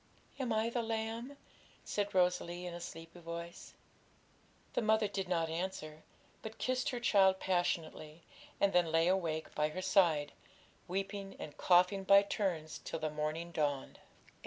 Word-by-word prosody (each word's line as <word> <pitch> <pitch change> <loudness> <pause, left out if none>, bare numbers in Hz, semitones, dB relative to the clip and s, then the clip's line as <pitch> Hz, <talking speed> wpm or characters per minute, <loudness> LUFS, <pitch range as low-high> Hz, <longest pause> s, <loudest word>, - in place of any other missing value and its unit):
'Am 255 -3 -1
I 220 +1 +1
the 240 - 0
lamb?' 225 +4 -3 0.5
said 205 -1 -2
Rosalie, 180 -1 +1
in 175 - -5
a 175 - -7
sleepy 165 +1 -9
voice. 170 0 -8 1.0
The - - +1
mother 220 -1 +3
did 195 -2 -4
not 165 -2 +1
answer, 160 -2 -4 0.4
but 220 0 -8
kissed 255 0 0
her 245 - -3
child 195 -5 +4
passionately, 165 -3 -2 0.4
and 200 0 +3
then 175 -2 +3
lay 165 +1 +3
awake 170 -4 0
by 150 0 +1
her 185 +4 -5
side, 170 -6 +3 0.6
weeping 195 +1 -4
and 145 - -8
coughing 180 +2 +4
by 200 +1 +7
turns 175 -6 -2
till - - -4
the 155 -1 -2
morning 155 +3 -3
dawned. 145 -4 -2
180 Hz, 150 wpm, -34 LUFS, 165-200 Hz, 1.0 s, by